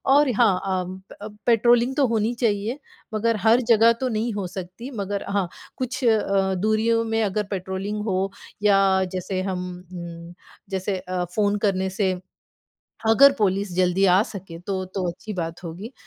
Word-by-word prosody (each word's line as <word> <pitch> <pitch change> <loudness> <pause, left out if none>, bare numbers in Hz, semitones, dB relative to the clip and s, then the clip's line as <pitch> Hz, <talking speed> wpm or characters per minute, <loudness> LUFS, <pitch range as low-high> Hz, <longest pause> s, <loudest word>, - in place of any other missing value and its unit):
और 290 -2 +5
हाँ, 200 -6 +4
अम, 185 0 -2 0.2
प 210 0 -8
पेट्रोलिंग 240 +2 +4
तो 275 -3 +4
होनी 225 +1 0
चाहिए 220 +4 0 0.3
मगर 225 +1 +1
हर 230 +3 +5
जगह 230 +1 +6
तो 260 - +1
नहीं 225 +1 -1
हो 200 -3 -3
सकती 190 +8 -8
मगर 200 0 -3
हाँ, 200 -3 0 0.3
कुछ 255 +1 -3
अ, 195 -4 +2
दूरियों 220 +4 +2
में 225 0 0
अगर 210 +1 0
पेट्रोलिंग 195 +2 -3
हो 190 -1 0 0.3
या 200 -1 +5 0.3
जैसे 185 +1 -2
हम 185 -2 -3 0.3
उम, 170 0 -8 0.4
जैसे 190 0 -2
अ, 180 -1 -3
फ़ोन 205 -1 +2
करने 200 -3 +1
से 190 0 0 1.0
अगर 275 +5 +7
पुलिस 200 -2 +1
जल्दी 185 +1 +3
आ 185 +3 +5
सके 185 -4 -9
तो, 185 +1 -3
तो 185 -1 -3
अच्छी 210 +5 -8
बात 165 0 -4
होगी। 185 +9 -7
200 Hz, 160 wpm, -24 LUFS, 185-225 Hz, 1.0 s, अगर